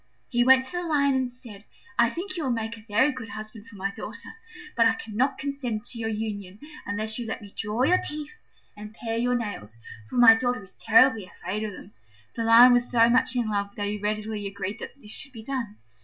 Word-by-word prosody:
He 240 -1 +2
went 260 +1 +6
to 355 - -4
the 355 - -2
Lion 290 -4 +2
and 260 -1 0
said, 235 -5 -12 0.4
"I 235 0 +5
think 370 +5 -5
you 340 - -3
will 270 - -1
make 225 -1 -2
a 225 - -14
very 230 +7 +2
good 255 -4 -8
husband 215 +1 -9
for 230 - -14
my 195 0 -3
daughter: - - -9 0.4
but 230 -1 +5
I 225 - +2
cannot 225 +5 -1
consent 265 -6 -3
to 235 - -5
your 225 -1 -2
union 205 -3 -4 0.3
unless 215 +2 -2
you 235 - -4
let 220 - -4
me 205 -2 -13
draw 210 +4 -1
your 365 +7 +4
teeth 300 +2 -6 0.4
and 210 +1 -10
pare 230 -1 -3
your 245 +1 +1
nails, 205 - -5 0.3
for - - -8
my 240 -2 +9
daughter 245 -1 -1
is 190 - -12
terribly 225 -3 +4
afraid 200 +5 -5
of 210 -2 -4
them." 190 +2 -12 0.4
The 230 - -3
Lion 235 +2 +8
was 245 0 +2
so 230 -1 +5
much 250 +1 +3
in 240 -3 0
love 200 -1 -2
that 205 -1 -2
he 210 0 -3
readily 210 0 -3
agreed 200 +2 -5
that 280 - -9
this 210 -5 -9
should 275 +3 -6
be 225 -2 -9
done. 235 -4 -4
225 Hz, 230 wpm, -26 LUFS, 210-250 Hz, 0.4 s, my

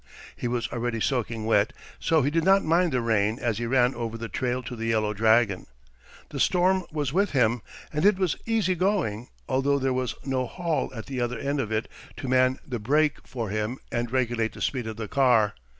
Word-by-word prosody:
He - - -3
was 120 -2 -1
already 120 -1 -2
soaking 115 -2 -1
wet, 110 +1 +2 0.3
so 160 -3 +2
he 140 - +1
did 165 +1 +1
not 195 +2 +5
mind 170 +2 +2
the 125 -2 +1
rain 110 -1 +1
as 115 -4 -1
he 120 - -2
ran 125 +1 +3
over 115 -1 -4
the 115 -1 -6
trail 125 +4 -2
to 125 - -6
the 115 0 -4
Yellow 110 -2 +1
Dragon. 110 -2 +2 0.6
The - - -6
storm 185 0 +3
was 145 -3 -2
with 195 0 +1
him, 120 -3 +2 0.3
and 150 +1 -1
it 205 -1 +5
was 185 -5 +1
easy 220 -5 +2
going, 175 - -1 0.2
although 135 +2 +2
there 135 -1 0
was 125 -1 -2
no 130 -2 -1
Hall 170 0 -2
at 110 - -6
the 130 -3 -4
other 120 0 -1
end 140 +4 -2
of 110 -5 -2
it 110 +1 -1 0.3
to - - -5
man 130 0 +3
the 120 -2 -3
brake 150 +7 +1
for 115 -5 -4
him 110 +4 -2
and 120 0 -2
regulate 120 -3 0
the - - -11
speed 125 -4 -1
of 110 -1 -6
the 110 -2 -4
car. 120 -5 +3
125 Hz, 215 wpm, -26 LUFS, 115-145 Hz, 0.6 s, not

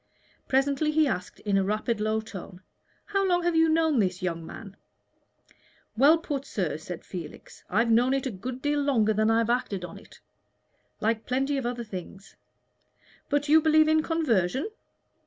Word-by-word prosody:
Presently 275 +3 +1
he 305 0 +3
asked, 180 -8 -4
in 200 -2 +1
a - - +1
rapid, 215 +3 -1
low 215 +1 0
tone, 190 -4 -10 0.4
"How 395 -1 0
long 355 -2 +2
have 345 -1 +1
you 325 0 +4
known 320 -4 +2
this, 185 -2 0
young 165 -2 -2
man?" 195 +4 -10 1.2
"Well 285 +8 +6
put, 290 -4 -4
sir," 180 - -2
said 165 +2 -8
Felix. 175 -4 -9
"I've 230 +4 +2
known 245 +4 +4
it 270 - -2
a 260 - -2
good 245 +6 -7
deal 290 0 +1
longer 230 -7 +2
than 215 +1 +2
I 225 - +3
have 230 0 +1
acted 240 -7 -1
upon 175 - -8
it, - - -18 0.8
like 220 +1 0
plenty 270 +3 0
of 265 -3 -1
other 240 -1 -3
things. 195 -2 -9 0.9
But 290 +1 0
you 315 +2 +6
believe 310 0 +4
in 315 0 +4
conversion?" 275 - 0
245 Hz, 175 wpm, -27 LUFS, 200-295 Hz, 1.2 s, Well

